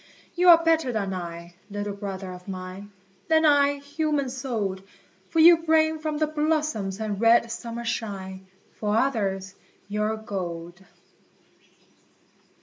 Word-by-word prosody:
You 360 +1 +4
are 335 -1 +8
better 325 -5 +3
than 200 -4 -2
I, 170 -1 -7 0.2
little 205 0 -4
brother 195 -2 -6
of 180 +1 -12
mine, 185 +1 -7 0.4
Than 320 -1 +4
I, 285 -1 +5
human 285 -1 -2
souled, 225 -8 -3 0.5
For - - -4
you 335 +1 +9
bring 315 -1 +2
from 310 -1 -3
the 310 - +2
blossoms 300 -10 -1
and 210 -2 -3
red 230 0 +4
summer 235 0 -6
shine, 190 -4 -5 0.3
For 210 0 0
others, 195 -7 -1 0.3
your 210 +2 -1
gold. 175 -4 -6
220 Hz, 130 wpm, -25 LUFS, 195-300 Hz, 0.5 s, you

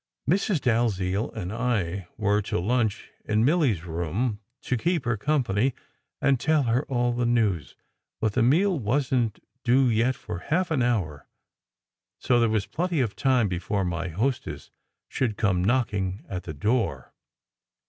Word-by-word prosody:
Mrs. 185 +1 +2
Dalziel 110 -4 +1
and 90 +3 -5
I 100 -7 -1
were 105 -1 +2
to 100 - -2
lunch 110 +2 0
in 110 +2 +1
Milly 150 -4 +3
s 85 -4 -8
room, 90 +7 -2 0.2
to 125 - 0
keep 165 +4 0
her 120 -1 +1
company 125 -1 +1 0.4
and 135 -2 +2
tell 155 +3 +2
her 120 +3 +1
all 120 -2 +1
the 120 0 0
news; 105 - 0 0.4
but 110 -2 0
the 130 - +2
meal 170 - +3
wasn 125 +1 +1
t 105 - -24 0.2
due 130 +1 +4
yet 120 +4 +2
for 90 - -6
half 175 - -1
an 145 -5 +2
hour, 95 - -1 0.9
so 120 -1 +2
there 115 -1 +3
was 110 -3 0
plenty 175 -1 -1
of 115 -6 0
time 130 -5 +2
before 95 +2 -1
my 85 0 -2
hostess 115 +10 -3 0.4
should 115 -6 -1
come 95 -4 +1
knocking 100 -4 0
at 90 -2 -5
the 80 - -5
door. 90 - -1
115 Hz, 160 wpm, -26 LUFS, 100-130 Hz, 0.9 s, due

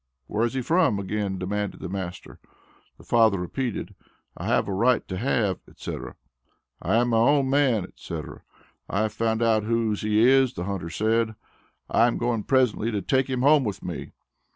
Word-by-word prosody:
"Where 105 +10 -1
is 120 - -7
he 130 - -1
from?" 165 - +2
again 100 0 -2
demanded 100 +2 -3
the - - -5
master. 90 -1 -6 0.6
The - - -16
father 110 -4 +3
repeated, 110 +7 -4 0.4
"I - - -6
have - - +2
a 100 - -2
right 120 +6 +2
to 95 - -4
have," 105 -4 0
etc., - - -7 0.7
"I - - 0
am 120 +1 +3
my 115 - +2
own 135 +2 +3
man," 135 -8 +3
etc. - - -8 0.5
"I 100 - 0
have 110 -1 -1
found 110 +1 0
out 110 -2 +3
whose 110 -1 0
he 105 +2 +3
is," 130 -1 +4
the 90 - -4
hunter 95 -3 -4
said. 110 +3 0 0.5
"I 115 - +4
am 120 - -1
going 115 -3 -1
presently 125 -4 +2
to 105 -4 -2
take 130 +4 +1
him 130 -1 -1
home 145 0 +5
with 105 -4 -4
me." 85 -5 -5
110 Hz, 180 wpm, -25 LUFS, 100-125 Hz, 0.7 s, home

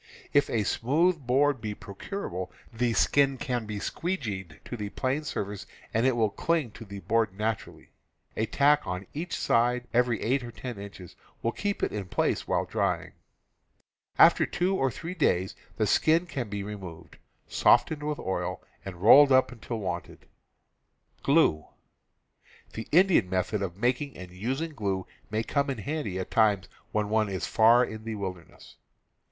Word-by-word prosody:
If 145 0 +4
a 110 -3 +1
smooth 160 - +2
e - - -19
board 135 0 +2
be 105 -1 -4
procurable, 95 - -6 0.2
the 120 +1 0
skin 135 +2 +3
can 120 -4 -3
be 105 -1 -4
"squee 175 - -2
geed" 95 - -6
to - - -5
the 105 -3 -4
planed 135 +7 -2
surface 105 -3 -4 0.3
and 115 +3 +3
it 130 - +2
will 110 -3 +2
cling 160 -1 0
to 115 - -11
the 100 -1 -8
board 110 -4 0
naturally. 110 0 -4 0.4
A 110 - 0
tack 145 +4 +4
on 90 +2 -4
each 170 +4 -4
side 125 +1 +1
every 120 -2 +2
eight 130 +3 +1
or 120 - -7
ten 120 -3 -7
inches 100 -3 -10 0.3
will 115 - +1
keep 205 +7 -3
it - - +1
in 105 -2 -4
place - - 0
while - - +1
drying. - - -1 1.1
After - - +7
two 185 +2 0
or 135 -7 +1
three 165 - -6
days 95 - +1 0.2
the 110 - +2
skin 160 - +3
can 130 -10 -4
be 100 -1 -4
re 105 +1 -5
moved, 90 -5 -11 0.3
softened 155 -2 +3
with 150 0 -2
oil, 95 - -3 0.2
and 95 -1 -8
rolled 140 +6 +8
up 130 0 +5
until 115 -1 -6
wanted. 90 -5 -5 1.0
The 140 - +3 1.2
Indian 175 - +4
method 95 +3 -1
of 90 -2 -4
making 125 +4 -1
and 90 -1 -9
using 130 - -3
glue 100 -7 -2 0.2
may 110 +1 -1
come 140 +4 0
in 135 - -2
handy 120 -5 -3
at 95 - -5
times 105 -4 +3 0.2
when 105 -1 0
one 110 -1 +2
is 95 -2 -3
far 115 +3 +5
in 110 -1 -8
the 115 -1 -4
wilder 95 -4 -5
ness. - - -17
115 Hz, 170 wpm, -28 LUFS, 100-140 Hz, 1.2 s, rolled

